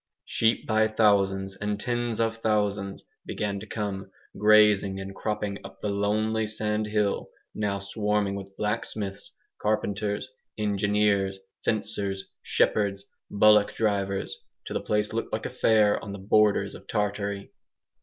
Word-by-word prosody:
Sheep 115 0 +1
by 110 0 +3
thousands, 100 -3 +2
and 105 0 -2
tens 120 -1 -2
of 115 0 +1
thousands, 105 -3 0 0.2
began 100 -2 -3
to 110 - -9
come, 100 -2 -4 0.3
grazing 105 -2 +5
and 95 0 -6
cropping 105 -1 -3
up 95 0 -11
to - - -7
the 100 - -1
lonely 110 +2 +1
sandhill 105 -1 -1 0.2
now 105 -2 -1
swarming 105 0 -1
with 100 0 -8
blacksmiths, 105 -2 -2 0.3
carpenters, 105 0 -1 0.3
engineers, 100 -1 +1 0.3
fencers, 100 -2 -1 0.2
shepherds, 100 -2 +1 0.3
bullock 105 0 +5
drivers 100 -3 0 0.3
till - - -5
the - - 0
place 105 0 0
looked 115 - -2
like 110 - -3
a - - -3
fair 110 -4 +3
on 100 - -6
the - - -5
borders 105 +1 +3
of - - -12
Tartary. 100 -1 -2
105 Hz, 135 wpm, -27 LUFS, 100-110 Hz, 0.3 s, grazing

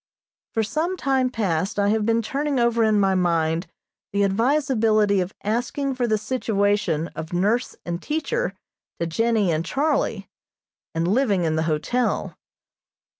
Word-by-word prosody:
For 225 - +2
some 320 - -1
time 265 -4 +1
past 195 -5 -1
I 200 0 +2
have 215 0 +1
been 230 0 +2
turning 280 +3 -1
over 235 -1 +3
in 215 -1 +3
my 195 -1 +3
mind 170 -1 +1 0.4
the 200 0 +1
advisability 220 -2 +2
of 180 +2 -5
asking 245 +6 -1
for 250 -2 -1
the 215 -1 +2
situation 205 -7 0
of 160 +2 -7
nurse 210 +8 +1
and 170 +1 -3
teacher 325 +12 -2 0.4
to 170 - 0
Jennie 215 +2 +1
and 160 0 0
Charlie, 290 - 0 0.7
and 165 +1 0
living 205 -3 +2
in 160 -1 +1
the 160 - +1
hotel. 235 +11 -1
215 Hz, 145 wpm, -23 LUFS, 185-250 Hz, 0.7 s, over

